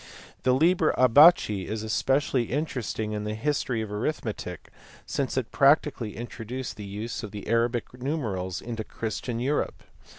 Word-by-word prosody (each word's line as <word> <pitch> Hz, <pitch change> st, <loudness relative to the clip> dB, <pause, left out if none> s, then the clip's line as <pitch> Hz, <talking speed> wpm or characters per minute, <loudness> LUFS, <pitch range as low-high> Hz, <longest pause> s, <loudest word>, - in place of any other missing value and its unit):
The 130 Hz, -, +3 dB
Liber 165 Hz, +3 st, +3 dB
Abaci 130 Hz, -, +6 dB
is 110 Hz, 0 st, -3 dB
especially 130 Hz, +3 st, +1 dB
interesting 125 Hz, -6 st, -2 dB
in 105 Hz, -1 st, -3 dB
the 105 Hz, 0 st, -3 dB
history 125 Hz, -2 st, -1 dB
of 105 Hz, -, -7 dB
arithmetic 105 Hz, -, -4 dB, 0.4 s
since 135 Hz, -2 st, -2 dB
it 125 Hz, -3 st, -1 dB
practically 140 Hz, -5 st, +3 dB
introduced 120 Hz, +2 st, -6 dB
the 105 Hz, -, -8 dB
use 105 Hz, +4 st, -5 dB
of 110 Hz, -, -6 dB
the 105 Hz, 0 st, -8 dB
Arabic 115 Hz, +2 st, 0 dB
numerals 110 Hz, -, -3 dB
into 115 Hz, -2 st, -4 dB
Christian 115 Hz, +2 st, -4 dB
Europe. 140 Hz, +5 st, -1 dB
120 Hz, 140 wpm, -27 LUFS, 110-135 Hz, 0.4 s, Abaci